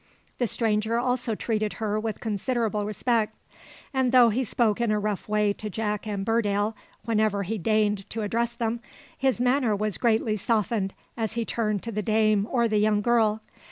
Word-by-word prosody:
The 245 - +2
stranger 220 +1 0
also 245 -2 0
treated 215 -1 -1
her 215 -1 -1
with 220 0 -4
considerable 220 -1 -1
respect; 220 +1 0 0.6
and 260 -2 +2
though 250 -2 +7
he 240 +5 0
spoke 230 -1 +1
in 235 - +1
a 210 - +2
rough 210 -1 -3
way 210 -1 +2
to 215 +1 -6
Jack 210 0 -3
and 200 -2 -3
Burdale, 210 -1 +1 0.3
whenever 215 -3 +1
he 215 +3 -3
deigned 210 0 +1
to 225 -1 -3
address 235 +3 -1
them, 235 0 -1 0.4
his 265 -2 +1
manner 250 -3 +2
was 210 0 -2
greatly 220 -2 +2
softened 210 -2 0 0.2
as 220 -3 -2
he 235 -1 -1
turned 215 -4 -1
to 230 - -4
the 210 -1 -2
dame 215 -1 +2
or 235 -3 +2
the 215 -1 +1
young 210 0 +3
girl. 220 -1 +2
220 Hz, 180 wpm, -26 LUFS, 210-235 Hz, 0.6 s, though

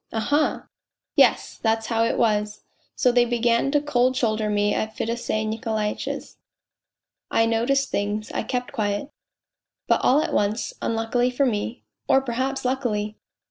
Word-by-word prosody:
" - - -43
Aha! 285 +7 0 0.2
" - - -66
" - - -65
Yes, - - +3
that 225 -1 +2
was 225 - -10
how 225 -1 +1
it 230 - 0
was! 210 -2 0 0.3
So 250 -3 +3
they 245 0 +4
began 240 +1 +1
to 290 +1 +3
cold 255 -3 +1
shoulder 215 -3 0
me 205 0 +1
at 220 0 -3
Fedosey 225 -1 -2
Nikolaitch's. 220 -1 -3 0.9
I 225 - +3
noticed 240 +5 +1
things, 205 +1 -2
I - - -1
kept 245 +3 -3
q< 210 +3 -2 0.8
but - - +3
all 275 - +4
at - - -3
once, 210 +2 0
unluckily 230 +2 0
for 255 +3 +1
me 225 0 -2 0.2
(or 270 - +5
perhaps 265 +1 -2
luckily 220 -5 -1
230 Hz, 160 wpm, -24 LUFS, 215-255 Hz, 0.9 s, or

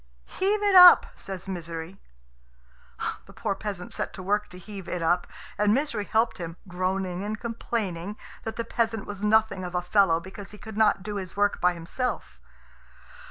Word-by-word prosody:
"Heave 410 +2 0
it 405 -1 +3
up," 360 -1 +10
says 190 -1 -8
Misery. 170 0 -6 1.3
The - - -14
poor - - -2
peasant 195 -3 -6
set - - -3
to 185 - -8
work 205 +2 0
to 180 - -11
heave 195 0 -9
it 180 -2 -3
up, 175 +2 +2 0.3
and 210 +1 +4
Misery 250 -7 -1
helped 225 0 +1
him, 165 -1 -6
groaning, 185 0 -2
and 210 +1 -3
complaining 210 -5 -3 0.2
that 225 0 -5
the 230 - -3
peasant 225 -2 -1
was 205 -1 -7
nothing 210 -2 +3
of 180 0 -5
a 180 - +1
fellow 180 -3 +4
because 190 +3 -10
he 210 - -11
could 220 0 -9
not 215 -3 +3
do 205 +1 -4
his 190 0 -6
work 205 0 +2
by 180 0 +3
himself. 175 +10 -4
200 Hz, 175 wpm, -26 LUFS, 180-220 Hz, 1.3 s, up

